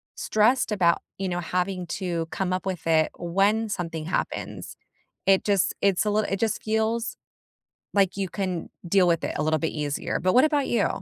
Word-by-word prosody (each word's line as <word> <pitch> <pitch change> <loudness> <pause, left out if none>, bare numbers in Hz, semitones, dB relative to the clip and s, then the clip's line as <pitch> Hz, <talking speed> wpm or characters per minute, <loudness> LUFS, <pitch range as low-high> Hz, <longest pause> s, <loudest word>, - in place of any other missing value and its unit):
stressed 220 +2 +2
about, 175 -5 +3 0.2
you 190 -1 -2
know, 175 0 -1
having 180 +1 -2
to 170 -3 -2
come 185 -1 -1
up 185 0 -2
with 180 -4 -4
it 160 -1 +3
when 200 +6 +1
something 165 -5 -4
happens. 175 - -3 0.5
It 195 -1 +5
just 200 -3 +2
it's 200 +1 +2
a - - +2
littl 210 -1 0
it 195 - -1
just 225 -1 0
feels 220 +1 0 0.8
like 195 -2 +3
you 195 -2 -2
can 185 -3 -3 0.2
deal 190 0 +4
with 165 -1 +2
it - - -3
a - - +1
little 155 0 +2
bit 160 - 0
easier. 145 -2 -2
But, 185 +1 +2
what 255 - +7
about 290 -3 +1
you? 230 -4 +2
190 Hz, 190 wpm, -25 LUFS, 170-210 Hz, 0.8 s, what